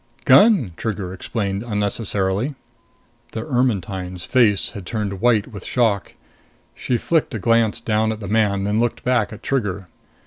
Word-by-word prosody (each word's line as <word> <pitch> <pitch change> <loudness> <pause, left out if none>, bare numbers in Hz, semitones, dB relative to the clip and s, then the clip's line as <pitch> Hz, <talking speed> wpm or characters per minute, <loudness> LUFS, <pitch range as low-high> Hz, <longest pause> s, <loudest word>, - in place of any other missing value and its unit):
"Gun," 200 - +6
Trigger 100 -5 -3
explained 100 +1 -3
unnecessarily. 105 +2 -1 0.8
The 110 - -4
Ermetyne's 100 - -1
face 115 -6 +2
had 100 -4 -8
turned 100 -1 -4
white 115 -4 +3
with 100 -4 -9
shock. 110 -6 0 0.6
She 125 - -1
flicked 155 -2 0
a - - 0
glance 115 +1 +2
down 110 -1 0
at 110 - -5
the 100 - -6
man, 100 -2 +1
then 105 +2 0
looked 120 0 -1
back 125 -4 +1
at 110 - -10
Trigger. 100 -8 -2
110 Hz, 145 wpm, -21 LUFS, 100-120 Hz, 0.8 s, Gun